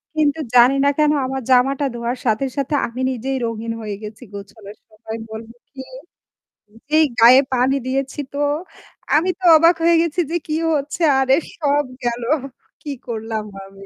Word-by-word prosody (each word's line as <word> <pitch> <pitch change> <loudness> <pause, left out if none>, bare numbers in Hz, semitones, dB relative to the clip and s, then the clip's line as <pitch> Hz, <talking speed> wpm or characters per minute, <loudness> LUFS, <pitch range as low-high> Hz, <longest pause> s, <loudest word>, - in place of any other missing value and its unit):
কিন্তু 305 0 +1 0.2
জানি 245 +3 +6
না - - +5
কেন 300 -1 +3
আমার 265 0 -4
জামাটা 270 +3 +3
ধোয়ার 235 +2 -3
সাথে, 220 +5 +1
সাথে 280 +2 -1
আমি 245 +2 -7
নিজেই 265 +2 -3
রঙিন 230 0 -4
হয়ে 210 -2 -5
গেছি 220 +3 -9
গোছানোর 200 +1 -11
সময় 220 +1 -9
বলবো 225 +1 -9 0.2
কি 270 -2 -9 1.1
যেই 310 +1 +4
গায়ে 250 +4 +8
পানি 255 +2 +2
দিয়েছি 270 +2 -3
তো, 285 - -4 0.8
আমি 340 +5 +2
তো - - -17
অবাক 335 +2 +5
হয়ে 340 0 +4
গেছি 335 +1 -2
যে - - -1
কি 305 - -2 0.2
হচ্ছে 290 +4 -4 0.2
আরে 265 0 +3 0.2
সব 290 -2 +1 0.2
গেলো। 240 0 -2 0.5
কি 295 - -6 0.2
করলাম 220 -2 -4 0.2
আমি। 195 0 -14
260 Hz, 160 wpm, -19 LUFS, 225-290 Hz, 1.1 s, গায়ে